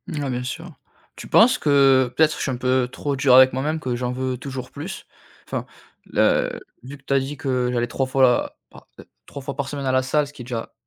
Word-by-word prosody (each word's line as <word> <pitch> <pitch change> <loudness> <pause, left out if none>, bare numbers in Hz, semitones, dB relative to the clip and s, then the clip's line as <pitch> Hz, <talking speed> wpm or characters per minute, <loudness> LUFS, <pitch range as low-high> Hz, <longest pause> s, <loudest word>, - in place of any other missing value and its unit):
Ah 145 -2 -3
bien 125 0 -3
sûr. 165 +7 -6 0.5
Tu - - -9
penses 235 +2 +5
que 135 -3 +3
peut-être 155 0 +4
que - - -5
je - - -6
suis 135 - -1
un - - -2
peu 125 0 +1
trop 140 +1 -3
dur 130 -1 +5
avec 130 0 +8
moi-même, 150 +5 -2
que 125 -3 -2
j'en 125 0 -2
veux 130 0 -3
toujours 130 -1 -7
plus? 160 +8 -7 0.4
Enfin, - - -4 0.4
là, - - +2
heu, - - -5 0.2
vu 135 +3 -9
que 140 - -28
tu 140 - -2
as 135 - +4
dit 135 +2 -5
que 130 -2 -1
j'allais 120 0 0
3 135 +3 -2
fois 130 -2 +2
pa - - -17
heu, - - -12 0.2
3 140 - -9
fois 140 +1 -6
par 140 -2 -2
semaine 140 0 -5
à 130 - +1
la 130 0 +2
salle, 150 +3 +1
ce - - -13
qui 130 - -10
est - - -13
déjà 115 -2 -5
130 Hz, 255 wpm, -22 LUFS, 125-140 Hz, 0.5 s, avec